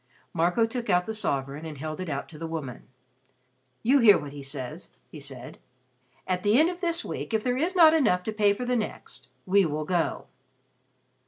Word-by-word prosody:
Marco 175 +7 +2
took 235 0 -5
out 180 -1 +3
the 220 - -4
sovereign 140 -7 -2
and 155 -3 -7
held 155 +3 -5
it 185 -2 -4
out 140 -1 -3
to 155 - -12
the 165 - -4
woman. 155 -7 -6 1.0
"You 270 +5 +4
hear 210 -6 +7
what 145 -1 -7
he 145 - -8
says," 135 +3 -6 0.2
he 155 - -9
said. 135 -3 -9 0.7
"At 180 -1 -1
the 210 +4 +3
end 325 +3 +4
of 360 +1 -10
this 340 -1 -1
week 225 - -4
if 215 - 0
there 250 -1 0
is 335 +8 -1
not 325 -3 +8
enough 215 - +2
to 220 - -3
pay 205 -1 +3
for 250 +5 -5
the 250 0 0
next, 220 -3 -5 0.2
we 195 +1 +4
will 155 -2 -2
go." 175 -1 -1
180 Hz, 200 wpm, -27 LUFS, 150-235 Hz, 1.0 s, not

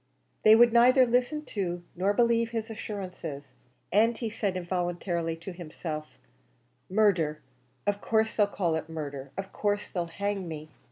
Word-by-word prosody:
They 215 0 +8
would 235 0 +6
neither 255 +2 +7
listen 250 +5 +1
to 175 -4 -2
nor 190 +3 +2
believe 230 +1 +3
his 225 -1 -4
assurances; 180 -11 -6 0.4
and 225 +4 +4
he 225 -2 -3
said 200 -4 -1
involuntarily 175 -2 -2
to 165 +4 -8
himself 155 -3 -6 0.7
"Murder! 180 -7 +2 0.5
of 205 0 0
course 220 0 +1
they'll 210 -2 +4
call 180 -5 -1
it 160 0 -3
murder! 140 -4 -5
of 195 0 -5
course 205 0 -1
they'll 175 -2 -2
hang 200 +2 -3
me!" 155 -1 -7
195 Hz, 150 wpm, -28 LUFS, 165-220 Hz, 0.7 s, They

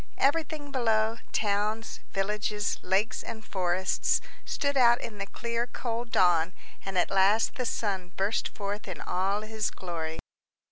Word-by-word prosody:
Everything 295 0 +1
below, 225 -3 +2
towns, 210 +2 0
villages, 210 +1 0
lakes, 195 +4 +1
and 220 -2 -7
forests, 185 0 +1 0.3
stood 285 -1 0
out 240 -2 +6
in 210 -3 -7
the 195 - -3
clear 235 +3 -2
cold 235 -1 -3
dawn, 175 -1 +4 0.3
and 195 -1 -3
at 180 - +2
last 195 +3 +4
the 255 -3 -2
sun 190 -6 -1
burst 200 +3 +1
forth 205 0 -5
in - - -5
all 195 +3 0
his 215 -1 -1
glory. 165 -5 -4
210 Hz, 140 wpm, -29 LUFS, 190-230 Hz, 0.3 s, out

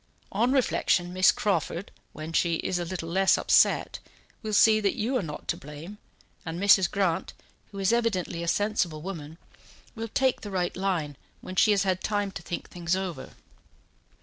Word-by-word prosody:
On 235 +6 +1
reflection, 180 -9 +1
Miss 185 +1 +5
Crawford, 190 -1 -2 0.2
when 155 +1 -8
she 170 0 +2
is 175 +2 -2
a 175 - -2
little 170 -1 -5
less 190 +2 +3
upset, - - +3 0.4
will 215 - -4
see 215 +1 +5
that 205 -2 0
you 245 +3 -1
are 255 - +2
not 150 -4 -7
to - - +1
blame, 150 +8 -10 0.4
and 165 +1 -5
Mrs. 195 -2 +5
Grant, 185 -4 -1 0.4
who 200 - -10
is 195 +3 +2
evidently 195 -7 0
a 170 - -4
sensible 175 -6 0
woman, 160 -4 -7 0.6
will 225 -1 -5
take 260 +3 +1
the 205 - -7
right 180 -2 -1
line 175 -7 -2 0.2
when 185 - -8
she 215 - +4
has 200 -2 +3
had 185 -1 0
time 205 -2 -1
to 165 - -7
think 170 +1 -5
things 175 0 -2
over." 190 -3 -5
185 Hz, 175 wpm, -27 LUFS, 170-205 Hz, 0.6 s, Miss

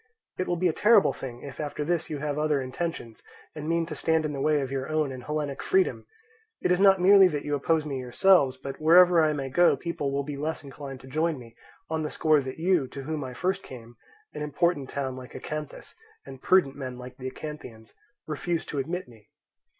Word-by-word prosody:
It 185 - -1
will 175 - 0
be 180 +1 +1
a 165 - +1
terrible 210 +1 +5
thing 120 -2 -8
if 140 - -9
after 150 -1 -3
this 170 0 -1
you 150 - -3
have 145 0 -3
other 150 -2 +1
intentions, 130 -3 -5 0.3
and 155 0 -6
mean 165 0 +1
to 160 - -6
stand 160 +1 +1
in 150 - -2
the 135 - -4
way 150 0 +2
of 135 -1 -4
your 135 0 -3
own 155 -3 0
and 130 -1 -7
Hellenic 150 -1 -3
freedom. 380 0 +1 0.5
It - - 0
is 180 +1 +3
not 195 -1 +6
merely 195 +1 +7
that 150 -5 -3
you 145 - -2
oppose 155 +2 +1
me 140 -3 -3
yourselves; 130 +2 +3
but 135 +3 -8
wherever 175 +2 +7
I 155 -1 +2
may 135 -2 -4
go 175 +7 +4
people 150 -5 -3
will 140 +1 -1
be 145 0 -6
less 155 +2 -3
inclined 135 -1 -9
to 130 - -13
join 155 +3 0
me, 115 -2 -13 0.3
on 160 0 -2
the 150 - -2
score 155 -2 +3
that 130 -1 -6
you, 170 -4 +2
to 135 +2 -8
whom 155 +1 -3
I 130 -1 -7
first 190 +7 -1
came—an 135 - -13
important 150 -1 0
town 135 -2 -3
like 130 0 -10
Acanthus, 150 -1 -7 0.3
and 135 -1 -11
prudent 180 -8 +3
men 130 -3 -6
like 125 0 -10
the 130 0 -5
Acanthians—refused 150 - -7
to 145 - -2
admit 175 +5 -3
me. 110 -4 -19
150 Hz, 215 wpm, -27 LUFS, 135-170 Hz, 0.5 s, merely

